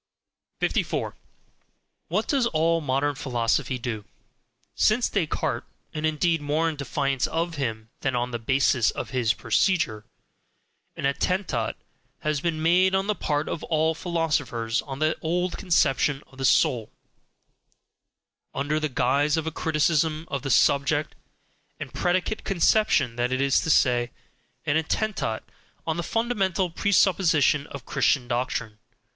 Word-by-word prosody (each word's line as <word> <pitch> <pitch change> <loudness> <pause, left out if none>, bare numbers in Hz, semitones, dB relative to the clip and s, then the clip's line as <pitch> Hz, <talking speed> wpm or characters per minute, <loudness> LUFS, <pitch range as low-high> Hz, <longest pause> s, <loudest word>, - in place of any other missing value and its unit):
54. - - -1 0.9
What - - -1
does 270 -5 +2
all 165 -2 +1
modern 145 +1 0
philosophy 125 -1 -1
mainly 125 - -7 0.2
do? - - -27 0.7
Since 235 +3 +2
Descartes 175 -7 -1 0.3
and 155 0 -1
indeed 160 +1 +1
more 150 +3 0
in 160 - -2
defiance 140 -3 -1
of 165 -1 -2
him 110 -4 -3
than 135 -2 -1
on 120 +1 -1
the 120 - -3
basis 125 -1 +2
of - - -5
his 120 -3 +1
procedure 115 - +1 0.9
an - - -4
ATTENTAT 140 - 0 0.5
has 150 -2 -1
been 160 -2 -1
made 185 +3 +4
on 190 0 +1
the 210 - +1
part 150 -6 -1
of 155 - -4
all 160 0 +1
philosophers 150 -9 -1
on 135 -2 -7
the 155 +2 +1
old 175 +3 -1
conception 150 -6 +2
of 135 - -16
the 135 - 0
soul, 115 -3 +3 1.7
under 145 +3 0
the 155 -1 -1
guise 140 +4 +2
of 160 - -1
a 160 - -2
criticism 155 0 +1
of 140 -2 -2
the 135 - -4
subject 140 +3 +2 0.7
and - - -7
predicate 180 +4 0
conception 190 - +2
that 120 +1 0
is 135 +1 +2
to - - -3
say, 120 -4 +3 0.6
an 150 0 +2
ATTENTAT 160 - -1 0.4
on 160 0 -1
the - - -1
fundamental 195 -4 0
presupposition 165 -7 +3
of 140 -3 -9
Christian 125 -3 +1
doctrine. 120 -3 -2
150 Hz, 140 wpm, -25 LUFS, 130-165 Hz, 1.7 s, made